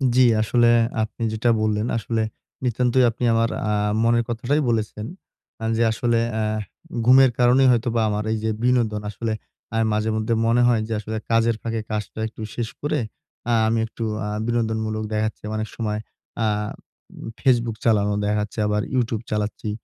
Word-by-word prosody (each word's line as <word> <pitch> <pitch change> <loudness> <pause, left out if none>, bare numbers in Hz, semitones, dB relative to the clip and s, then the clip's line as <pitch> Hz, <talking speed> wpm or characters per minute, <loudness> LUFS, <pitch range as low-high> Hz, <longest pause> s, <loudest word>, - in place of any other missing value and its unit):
জি, 130 - +5 0.2
আসলে 120 +2 +3 0.4
আপনি 110 +1 -5
যেটা 110 +2 +1
বললেন, 110 0 +1
আসলে 115 0 -1 0.4
নিতান্তই 125 +1 +2
আপনি 115 +2 -6
আমার 115 0 +2 0.2
আ - - +1 0.3
মনের 120 0 +3
কথাটাই 125 +6 0
বলেছেন। 110 -1 -1 0.6
আ - - -3
যে 115 - +3
আসলে 120 +1 +1
অ্যা 110 0 0 0.6
ঘুমের 130 0 +7
কারণেই 125 +2 +5
হয়তোবা 120 -1 +1
আমার 105 0 -1
এই 110 - 0
যে 110 - +1
বিনোদন, 120 -4 +2
আসলে 110 +1 -3 0.6
মাঝেমধ্যে 110 +1 0
মনে 115 +2 +3
হয় 115 -3 +3
যে 115 - -3
আসলে 110 +1 -4
কাজের 115 0 +3
ফাঁকে 115 -1 -2
কাজটা 105 0 -4
একটু 110 - -11
শেষ 115 -2 -2
করে, 145 0 0 0.5
অ্যা 120 - +1
আমি 115 +1 +1
একটু 115 - -7 0.2
অ্যা 105 - -3 0.2
বিনোদনমূলক 110 -2 -1
দেখাচ্ছে 110 0 -2
অনেক 110 0 -2
সময়, 105 -2 -2 0.4
অ্যা 115 - +1 0.9
Facebook 120 -4 +2
চালানো, 105 -3 +3
দেখাচ্ছে 105 +1 -1
আবার 105 0 +1
YouTube 115 -3 0
চালাচ্ছি। 105 0 -2
115 Hz, 155 wpm, -23 LUFS, 110-120 Hz, 0.9 s, ঘুমের